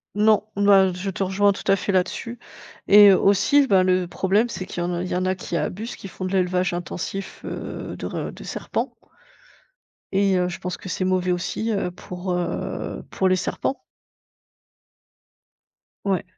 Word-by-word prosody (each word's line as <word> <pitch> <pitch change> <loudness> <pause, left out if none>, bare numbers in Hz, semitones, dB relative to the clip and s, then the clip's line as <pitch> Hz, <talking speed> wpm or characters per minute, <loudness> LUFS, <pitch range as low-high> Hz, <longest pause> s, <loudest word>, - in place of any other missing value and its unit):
Non, 210 0 +4
n 205 - 0
bah, 195 -2 +6
je 185 +2 -4
te 195 +1 -2
rejoins 200 +2 +3
tout 195 - -6
à - - +6
fait 200 +1 -2
là-dessus 210 +6 -1 0.5
et 205 0 +9
aussi, 205 +10 +4
bah 190 -3 +4
le 185 -1 +2
problème, 195 +6 +1
c'est 200 -5 -5
qu'il 175 - -5
y - - 0
en 175 0 -2
il 180 - -3
y - - -1
en 185 +1 0
a 185 0 +1
qui 175 -1 -4
abusent, 190 +9 -4
qui - - -9
font 185 - -8
de 185 - -3
l'élevage 180 -1 +1
intensif, 180 +2 -5
heu, - - -6
de - - -6
re - - -4
de - - -11
serpents - - -3 1.2
et 195 0 +3
heu, 180 - +1
je 175 - -6
pense 180 0 -4
que 185 - -9
c'est 185 - -1
mauvais 185 -1 +1
aussi, 200 +5 -2
heu, 195 -4 -1
pour, 180 +1 -6
heu, 175 0 -3
pour 190 - +1
les 185 - +4
serpents. 265 +8 -2 2.2
Ouais. 190 -3 +1
185 Hz, 185 wpm, -23 LUFS, 180-200 Hz, 2.2 s, et